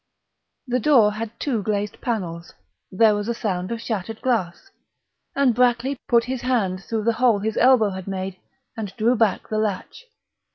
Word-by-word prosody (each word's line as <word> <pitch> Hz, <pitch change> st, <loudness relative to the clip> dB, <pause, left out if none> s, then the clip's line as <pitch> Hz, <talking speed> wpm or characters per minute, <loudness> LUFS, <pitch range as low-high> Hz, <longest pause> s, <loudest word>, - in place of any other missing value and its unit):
The 250 Hz, -1 st, 0 dB
door 235 Hz, -6 st, +5 dB
had 230 Hz, +1 st, -6 dB
two 245 Hz, -7 st, -1 dB
glazed 205 Hz, 0 st, -3 dB
panels; 175 Hz, -8 st, -4 dB, 0.4 s
there 215 Hz, +3 st, +4 dB
was 205 Hz, 0 st, -2 dB
a 235 Hz, -, -1 dB
sound 185 Hz, -3 st, -3 dB
of 230 Hz, -, -3 dB
shattered 220 Hz, -1 st, -4 dB
glass; 235 Hz, -, -2 dB, 0.6 s
and 275 Hz, -3 st, +3 dB
Brackley 250 Hz, +3 st, +2 dB
put 235 Hz, -1 st, +4 dB
his 250 Hz, 0 st, -4 dB
hand 200 Hz, -7 st, 0 dB
through 220 Hz, 0 st, -3 dB
the 230 Hz, +1 st, +2 dB
hole 240 Hz, -4 st, +5 dB
his 215 Hz, +2 st, -3 dB
elbow 245 Hz, -5 st, +5 dB
had 190 Hz, 0 st, -7 dB
made 190 Hz, -1 st, -4 dB, 0.4 s
and 215 Hz, -4 st, -5 dB
drew 235 Hz, +3 st, +3 dB
back 225 Hz, -4 st, +1 dB
the 215 Hz, -, -1 dB
latch. 215 Hz, -, -3 dB
220 Hz, 170 wpm, -23 LUFS, 200-240 Hz, 0.6 s, door